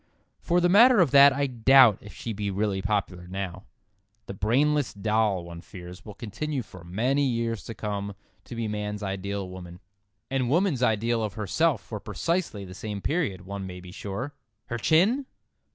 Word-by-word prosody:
For 175 +1 +1
the 175 - +3
matter 230 +5 +7
of 165 -8 +4
that 140 0 +8
I 140 +1 0
doubt 125 -2 +6
if 105 - -11
she 115 - -6
be 100 -1 -3
really 100 0 -1
popular 95 -3 -2
now. 95 0 -5 0.6
The - - -6
brainless 135 +8 +1
doll, 105 -2 +1
one 85 -1 -9
fears, 90 +1 -11
will 105 -2 -10
continue 130 +5 -4
for 90 -4 -13
many 120 +11 0
years 115 -4 -1
to 115 - -7
come 100 -1 -4 0.3
to 120 - -8
be 115 -1 -2
man's 105 0 -4
ideal 100 0 -3
woman—and 95 +7 -7
woman's 165 -3 +2
ideal 115 0 +1
of 105 -1 -4
herself 115 - +1
for 105 - -7
precisely 110 - -2
the 90 - -10
same 105 +1 -5
period, 135 - -1
one 95 0 -6
may 90 -1 -8
be 90 0 -11
sure. 105 +9 -5 0.4
"Her 120 - -3
chin!" 205 - +3
105 Hz, 170 wpm, -26 LUFS, 95-135 Hz, 0.6 s, that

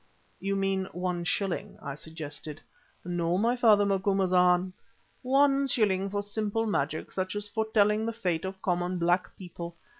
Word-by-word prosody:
"You 195 +1 -1
mean 195 -1 0
one 180 -1 -2
shilling," 195 +1 -2
I 140 -2 -5
suggested. 155 0 -7 0.5
"No, 175 0 0
my 230 +5 +2
father 215 -4 +5
Macumazana. 185 -2 +3 0.5
One 275 +1 +3
shilling 200 -6 +1
for 205 +1 -2
simple 215 +2 -1
magic 155 -7 -1
such 185 +1 -3
as 205 0 -2
foretelling 220 0 +1
the - - 0
fate 180 -8 -1
of 190 0 -5
common 180 0 0
black 175 +1 +1
people. 170 -2 -8
190 Hz, 145 wpm, -28 LUFS, 175-210 Hz, 0.5 s, father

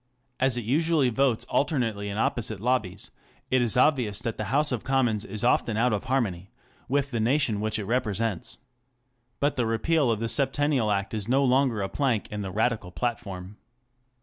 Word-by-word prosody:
As 130 -1 +2
it 120 - -2
usually 150 +1 +2
votes 130 -1 +1
alternately 115 -9 0
in 100 - -4
opposite' 115 -4 -1
lobbies 105 -5 -1 0.4
it 130 -1 +4
is 120 -1 +1
obvious 125 -7 +3
that 115 0 -3
the 110 - -2
House 145 +7 +2
of 120 -4 -2
Commons 125 -6 +1
is 105 +2 -5
often 115 -2 +2
out 120 +1 +2
of 105 +3 -2
harmony 105 -9 -1 0.4
with 140 +1 0
the 115 - -1
nation 115 -2 +1
which 110 0 -1
it 105 - -4
represents. 110 -4 -1 0.8
But 145 0 0
the 120 -2 +1
repeal 135 +5 +1
of 110 -2 0
the 115 - -1
Septennial 140 -2 +1
Act 100 0 -1
is 105 -2 -2
no 135 +2 +3
longer 130 -5 +2
a - - -1
plank 125 -3 -1
in 105 0 -4
the 95 - -4
Radical 110 -1 -1
platform. 100 -3 -4
115 Hz, 180 wpm, -26 LUFS, 105-135 Hz, 0.8 s, it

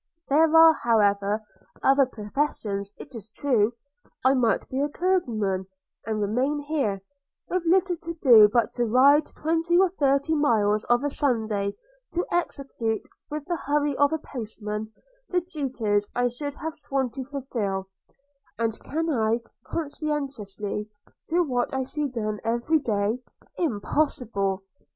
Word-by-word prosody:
– 330 - -38
There 315 +3 +5
are, 325 0 +9
however, 210 -4 +2 0.4
other 270 0 +5
professions, 210 -4 -3
it 280 - -11
is 220 -3 -9
true 235 -2 +1 0.3
– 290 - -30
I 260 - +6
might 235 -6 +1
be 260 - -3
a 290 - +1
clergyman, 225 - 0 0.4
and 220 -1 -1
remain 250 +8 0
here, 275 -10 -1 0.5
with 365 +1 0
little 360 0 +3
to 335 +1 -6
do 235 -9 +7
but 235 -2 +2
to 240 - 0
ride 275 +6 +5
twenty 330 +2 0
or 380 0 +5
thirty 280 -2 +1
miles 215 -8 +2
of 240 +2 +2
a 290 - +1
Sunday, 220 -8 0 0.4
to 350 - 0
execute, 270 -9 -2 0.2
with 300 -1 -5
the 350 - -1
hurry 290 -1 0
of 285 +2 +3
a 320 - +1
postman, 220 -6 -6 0.4
the 360 -1 +1
duties 255 - -1
I 245 0 +2
should 285 +4 -5
have 320 +1 -5
sworn 275 -4 -2
to 265 +1 -5
fulfil: 235 -9 -3 0.7
and 230 -1 0
can 325 +3 -3
I 230 -5 +1 0.3
conscientiously 275 -10 -3 0.4
do 350 +2 +3
what 250 -5 -1
I 265 - 0
see 295 +3 -2
done 215 -5 -3
every 240 +8 +1
day? 215 -2 0 0.4
Impossible! 215 - 0
260 Hz, 145 wpm, -26 LUFS, 215-300 Hz, 0.7 s, are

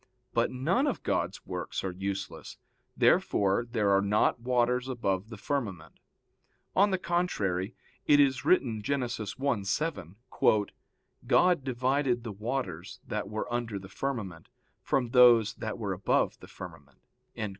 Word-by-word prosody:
But 115 0 +2
none 170 - +1
of 275 - -2
God's - - -2
works - - -4
are 95 - -2
useless. 95 +1 -5 0.4
Therefore 100 +4 +3
there 105 -4 +2
are 100 0 +4
not 105 +4 +2
waters 125 +1 +1
above 105 -5 -2
the 110 - -8
firmament. 105 - -4 0.8
On 200 +2 +5
the 190 - +1
contrary, 115 - -1 0.3
It 145 - +6
is 135 -4 +3
written 120 -11 +2
(Gen. 140 +6 0
1:7): 115 - -1 0.6
"(God) 180 -5 +4
divided 130 -1 0
the 115 - -5
waters 105 -5 -4
that - - -3
were 110 +2 -4
under 120 -4 -2
the 95 -1 -10
firmament, 100 -10 -4 0.3
from 125 -3 0
those 120 -4 +6
that - - -5
were - - -2
above - - 0
the - - -12
firmament." 70 -2 -11
120 Hz, 135 wpm, -29 LUFS, 100-135 Hz, 0.8 s, It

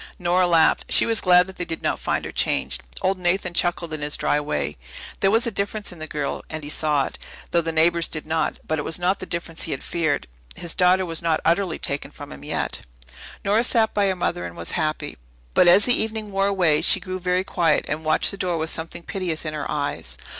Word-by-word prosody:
Nora 180 0 +2
laughed. 165 -2 +3
She - - +7
was 225 -1 +1
glad 180 -1 +6
that 190 0 -12
they - - -3
did 165 - -5
not - - 0
find - - -1
her - - -5
changed. - - 0 0.2
Old 190 0 +1
Nathan 180 0 0
chuckled 175 -2 0
in 155 - -5
his 145 0 -1
dry 145 - +1
way. 110 - -3 0.4
There 195 - +3
was 225 +3 +3
a 235 - -1
difference 200 +1 -1
in 175 - -12
the 155 - -6
girl, 150 -2 -3
and 155 -1 -6
he 145 - -6
saw 150 -3 +1
it, - - -8 0.3
though 170 - +3
the 165 0 -2
neighbours 165 +1 +3
did 155 - -4
not, 160 +1 -1
but 155 -1 0
it - - 0
was 160 - -1
not 180 +2 0
the 185 - -7
difference 170 -1 -3
he 160 - -5
had 135 - -6
feared. 155 - -1 0.3
His 170 -1 -2
daughter 185 +1 +3
was 165 -2 -3
not 165 -2 +1
utterly 170 +1 +1
taken 140 +1 -3
from - - -11
him 70 +1 -10
yet. - - -3 0.7
Nora 210 +4 +3
sat 230 -3 +2
by 205 -1 +2
her 190 - 0
mother 170 - -2
and 85 -1 -7
was 85 - 0
happy. 155 - -2 0.3
But 180 - +5
as 190 +4 +7
the 245 - +5
evening 220 -1 -4
wore 195 0 +1
away 175 -7 +2
she - - +5
grew 185 0 -5
very 180 +1 0
quiet, 170 -5 +1
and 155 +2 -3
watched 155 - +3
the 200 - -8
door 180 -3 -1
with 160 0 -1
something 165 +1 -6
piteous 175 -5 -3
in 155 - -3
her 150 -2 -4
eyes. 145 - -3
170 Hz, 240 wpm, -23 LUFS, 155-185 Hz, 0.7 s, She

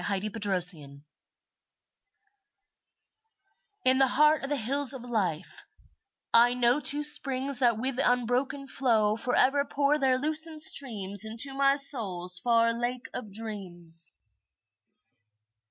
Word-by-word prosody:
My 200 - -1
Springs 180 -9 -2 2.8
In 260 +1 +2
the 270 - +3
heart 300 +3 +2
of 275 - -4
the 290 - 0
Hills 275 +3 +2
of 260 -3 -10
Life, 195 -10 -4 0.7
I 240 +1 +4
know 245 +2 +1
Two 290 +1 +1
springs 275 -2 +2
that 240 -4 +1
with 255 +2 -4
unbroken 250 +3 -2
flow 225 -6 -1
Forever 255 +4 +1
pour 285 +1 -1
their 260 -2 +1
lucent 310 +2 +1
streams 205 -9 +1
Into 230 +5 -1
my 275 0 +1
soul's 190 -11 +3
far 230 +1 +1
Lake 245 +2 -5
of 215 -5 -6
Dreams. 175 -7 -4
245 Hz, 115 wpm, -26 LUFS, 210-275 Hz, 2.8 s, I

